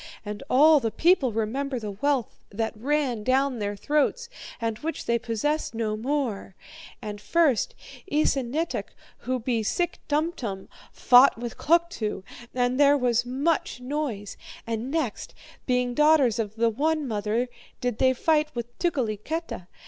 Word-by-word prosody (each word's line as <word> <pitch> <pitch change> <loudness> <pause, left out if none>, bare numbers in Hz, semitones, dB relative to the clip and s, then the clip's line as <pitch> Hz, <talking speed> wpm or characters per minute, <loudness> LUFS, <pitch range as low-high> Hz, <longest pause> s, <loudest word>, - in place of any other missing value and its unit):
And 205 0 -5
all 300 +4 +6
the 230 -4 -1
people 315 - +3
remember 250 +5 -2
the 215 -3 -5
wealth 260 +4 -1
that 220 +2 -2
ran 255 -1 -1
down 260 +1 +1
their 205 0 -2
throats, 300 - 0 0.3
and 225 -2 -2
which 325 +2 -4
they 235 0 +1
possess 235 +4 -2
no 220 -2 -1
more. 230 -5 -2 0.5
And 205 -1 -6
first, 305 -1 +2 0.4
Esanetuk, 290 +1 0 0.2
who 255 0 -2
be 235 -1 -1
SICK 345 - -1
TUMTUM, 290 - -2 0.2
fought 250 +1 +6
with 235 0 -5
Kluktu, 330 - 0 0.3
and 250 +1 +1
there 290 0 +6
was 245 -2 +1
much 275 +2 0
noise. 250 -7 -4 0.3
And 230 +2 -3
next, 285 -8 -3 0.3
being 250 -1 +1
daughters 300 -5 +4
of 215 -1 -3
the 230 0 +2
one 305 +4 0
mother, 215 +2 -1 0.3
did 245 -3 -2
they 260 0 +4
fight 305 +3 +2
with 240 0 -5
Tukeliketa. 270 - -2
250 Hz, 140 wpm, -26 LUFS, 225-295 Hz, 0.5 s, all